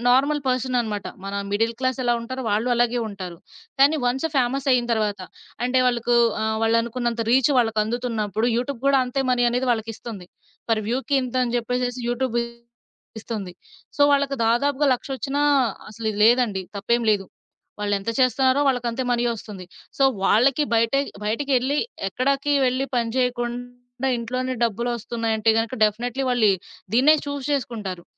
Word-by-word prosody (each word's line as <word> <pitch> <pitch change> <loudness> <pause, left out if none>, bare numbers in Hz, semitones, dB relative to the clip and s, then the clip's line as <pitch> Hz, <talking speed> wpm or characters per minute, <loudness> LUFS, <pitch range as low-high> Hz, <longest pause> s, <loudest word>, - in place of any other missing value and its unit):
Normal 280 +4 +3
person 255 0 0
అన్నమాట. 210 -3 -4 0.2
మన 200 0 -5 0.2
middle 225 +3 0
class 255 -1 0
ఎలా 240 - +3
ఉంటారో 260 +3 -5
వాళ్ళు 220 +4 +1
అలాగే 240 0 +1
ఉంటారు. 185 -4 -7 0.4
కానీ 290 +3 +6
వన్స్ 260 +5 0
ఫ్యామస్ 265 +2 0
అయిన 245 -1 +3
తరువాత 210 -3 -1 0.4
అంటే 250 +1 +2
వాళ్ళకు 240 -1 +1 0.3
ఆహ్, 220 0 0
వాళ్ళనుకున్నంత 230 +1 0
రీచ్ 260 +2 +4
వాళ్ళకి 225 -3 +2
అందుతున్నప్పుడు 225 -2 -2
యూట్యూబ్ 250 0 -3
గూడా 275 -1 +5
అంతే 270 +2 -1
మనీ 245 -1 +2
అనేది 250 +1 -1
వాళ్ళకిస్తుంది. 225 -3 -6 0.4
ఫర్ 220 -1 +2
వ్యూ‌కి 265 +4 0
ఇంతని 250 -1 -1
చెప్పేసేసి 245 +1 -2
యూట్యూబ్ 245 0 -1 0.8
ఇస్తుంది. 210 -5 -5 0.4
సో 290 - +3
వాళ్ళకి 280 -1 +1
దాదాపుగా 280 +5 +2
లక్ష 245 - -9
ఒచ్చినా 280 +2 -2 0.5
అసలిది 220 -1 -4
లేదండి 230 -5 +3
తప్పేమి 235 +4 0
లేదు. 200 -2 +1 0.6
వాళ్ళేంత 205 +1 -1
చేస్తున్నారో 260 +2 +3
వాళ్ళకి 245 -3 +1
అంతే 245 +3 -3
మనీ 240 0 +1
ఒస్తుంది. 205 -4 -9 0.3
సో - - +2 0.2
వాళ్ళకి 265 +8 +3
బయటే 230 +4 +3 0.2
బయటికేళ్లి 265 +4 0 0.3
ఎక్కడకి 275 +6 0
వెళ్లి 255 +2 0
పని 230 -1 0
చేయకుండా 245 +1 -3
ఇంట్లోనే 255 +2 -3
డబ్బులొస్తున్నాయి 235 0 -2
అంటే 220 +1 +3
గనక 230 +3 -2
డెఫినైట్‌లి 245 +5 -1
వాల్లి 220 -5 +4 0.4
దీన్నే 295 +6 +6
చూస్ 285 -2 -4
చేసుకుంటారు. 215 -10 -3
240 Hz, 145 wpm, -23 LUFS, 225-260 Hz, 0.8 s, కానీ